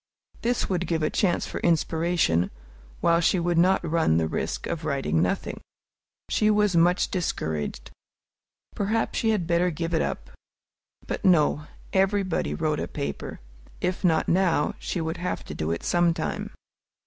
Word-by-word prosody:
This 245 Hz, 0 st, 0 dB
would 180 Hz, -2 st, -1 dB
give 160 Hz, -2 st, 0 dB
a 155 Hz, -, +1 dB
chance 180 Hz, -4 st, +1 dB
for -, -, -5 dB
inspiration, 165 Hz, -, +1 dB, 0.5 s
while 170 Hz, 0 st, +3 dB
she 175 Hz, -, +3 dB
would 175 Hz, 0 st, +1 dB
not 185 Hz, 0 st, +3 dB
run 160 Hz, -, +2 dB
the 80 Hz, -1 st, +1 dB
risk -, -, -3 dB
of 165 Hz, -, -4 dB
writing 135 Hz, -, 0 dB
nothing. 90 Hz, -, -2 dB, 0.7 s
She 215 Hz, -, +2 dB
was 210 Hz, -3 st, +3 dB
much 175 Hz, +3 st, +3 dB
discouraged. 80 Hz, -, -3 dB, 0.8 s
Perhaps 220 Hz, +3 st, -1 dB
she 225 Hz, -, +1 dB
had 210 Hz, -6 st, +1 dB
better 170 Hz, +1 st, +2 dB
give 165 Hz, +1 st, -3 dB
it 160 Hz, -, +2 dB
up? -, -, -4 dB, 0.7 s
But, -, -, -4 dB
no; 155 Hz, -4 st, +3 dB, 0.3 s
everybody 190 Hz, -, +1 dB
wrote -, -, 0 dB
a -, -, -2 dB
paper: 70 Hz, -3 st, -5 dB, 0.4 s
if 180 Hz, +2 st, -2 dB
not 165 Hz, -3 st, +3 dB
now, 175 Hz, -4 st, +2 dB
she 180 Hz, -, -3 dB
would 160 Hz, +1 st, -3 dB
have 180 Hz, +1 st, -3 dB
to -, -, -8 dB
do 80 Hz, -, -3 dB
it 85 Hz, +1 st, -2 dB
sometime! 175 Hz, -1 st, 0 dB
170 Hz, 155 wpm, -26 LUFS, 150-185 Hz, 0.8 s, while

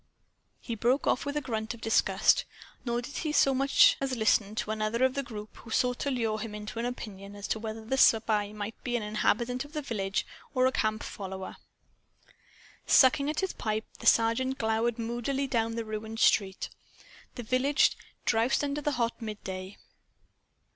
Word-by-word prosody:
He 235 Hz, -, -5 dB
broke 245 Hz, +5 st, +1 dB
off 255 Hz, -, +1 dB
with 285 Hz, +1 st, -2 dB
a -, -, 0 dB
grunt 225 Hz, -3 st, -3 dB
of -, -, -15 dB
disgust; 225 Hz, 0 st, +3 dB, 0.4 s
nor 240 Hz, -1 st, -1 dB
did 280 Hz, -, -7 dB
he 310 Hz, -, -2 dB
so 275 Hz, -2 st, +4 dB
much 275 Hz, +1 st, +5 dB
as 270 Hz, -1 st, -1 dB
listen 220 Hz, -2 st, +2 dB
to 215 Hz, -, -2 dB
another 220 Hz, +3 st, 0 dB
of 260 Hz, 0 st, +3 dB
the 275 Hz, -, -1 dB
group 215 Hz, -5 st, -9 dB
who 235 Hz, -, -13 dB
sought 250 Hz, +2 st, +1 dB
to 285 Hz, -, -1 dB
lure 225 Hz, -5 st, -1 dB
him 215 Hz, -1 st, -5 dB
into 210 Hz, +2 st, -6 dB
an 235 Hz, -, -1 dB
opinion 200 Hz, -5 st, -7 dB
as 205 Hz, 0 st, -6 dB
to 220 Hz, -, 0 dB
whether 220 Hz, 0 st, -6 dB
the 265 Hz, +4 st, 0 dB
spy 215 Hz, -3 st, +4 dB
might 210 Hz, +1 st, -5 dB
be 245 Hz, -1 st, -1 dB
an 225 Hz, -, -4 dB
inhabitant 235 Hz, +4 st, 0 dB
of 290 Hz, +1 st, -14 dB
the 305 Hz, -, -2 dB
village 200 Hz, -7 st, -2 dB, 0.3 s
or 255 Hz, 0 st, +4 dB
a 260 Hz, -, +3 dB
camp 215 Hz, -3 st, -1 dB
follower. 190 Hz, -1 st, -7 dB, 1.3 s
Sucking 280 Hz, +2 st, +5 dB
at 305 Hz, -, -1 dB
his 380 Hz, -, -2 dB
pipe; 215 Hz, 0 st, -2 dB
the -, -, -3 dB
Sergeant 245 Hz, +4 st, +3 dB
glowered 225 Hz, +1 st, 0 dB
moodily 240 Hz, +4 st, -2 dB
down 230 Hz, -3 st, 0 dB
the 230 Hz, -1 st, -3 dB
ruined 220 Hz, +1 st, -5 dB
street. 195 Hz, -5 st, +2 dB, 0.7 s
The 245 Hz, -, -5 dB
village 255 Hz, +5 st, +3 dB, 0.3 s
drowsed 230 Hz, +5 st, +2 dB
under 290 Hz, +1 st, -2 dB
the 295 Hz, 0 st, 0 dB
hot 235 Hz, -1 st, -1 dB
midday. 195 Hz, -3 st, -6 dB
230 Hz, 180 wpm, -29 LUFS, 215-260 Hz, 1.3 s, much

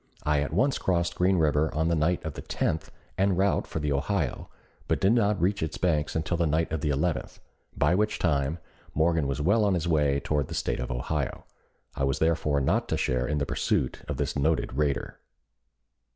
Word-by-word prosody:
I 75 Hz, -1 st, +2 dB
at 75 Hz, -, -2 dB
once 130 Hz, -, +1 dB
crossed 85 Hz, -2 st, 0 dB
Green 90 Hz, +1 st, +2 dB
River 75 Hz, -1 st, +2 dB
on 80 Hz, +1 st, +1 dB
the 85 Hz, -, +2 dB
night 80 Hz, +3 st, 0 dB
of 80 Hz, -, -3 dB
the -, -, -7 dB
10th 80 Hz, 0 st, -2 dB, 0.3 s
en 95 Hz, -1 st, +3 dB
route 95 Hz, +2 st, +1 dB
for -, -, -5 dB
the 75 Hz, -2 st, -1 dB
Ohio, 75 Hz, 0 st, -1 dB, 0.4 s
but -, -, +1 dB
did 95 Hz, +4 st, +4 dB
not 105 Hz, -4 st, +2 dB
reach 95 Hz, +4 st, +1 dB
its 80 Hz, -3 st, -3 dB
banks 75 Hz, -3 st, 0 dB
until 80 Hz, +2 st, -1 dB
the 85 Hz, -1 st, +1 dB
night 80 Hz, +2 st, 0 dB
of 80 Hz, -2 st, -2 dB
the 75 Hz, -, 0 dB
11th, 80 Hz, +4 st, -1 dB, 0.4 s
by -, -, +3 dB
which 105 Hz, +3 st, +1 dB
time 75 Hz, -2 st, 0 dB, 0.4 s
Morgan 80 Hz, -1 st, +2 dB
was 70 Hz, +1 st, -2 dB
well 105 Hz, +6 st, +3 dB
on 100 Hz, -2 st, +2 dB
his 85 Hz, 0 st, -2 dB
way 75 Hz, -4 st, +2 dB
toward 75 Hz, -2 st, -1 dB
the -, -, -6 dB
State -, -, -1 dB
of 60 Hz, -, -3 dB
Ohio. 65 Hz, +3 st, -3 dB, 0.5 s
I -, -, -3 dB
was 70 Hz, 0 st, +1 dB
therefore 80 Hz, -3 st, +1 dB
not 65 Hz, -, +1 dB
to -, -, 0 dB
share 65 Hz, -1 st, 0 dB
in 75 Hz, -, -1 dB
the 70 Hz, -, 0 dB
pursuit 65 Hz, -, -1 dB
of -, -, -3 dB
this -, -, -2 dB
noted 75 Hz, -2 st, 0 dB
raider. 70 Hz, 0 st, -1 dB
80 Hz, 210 wpm, -27 LUFS, 75-90 Hz, 0.5 s, did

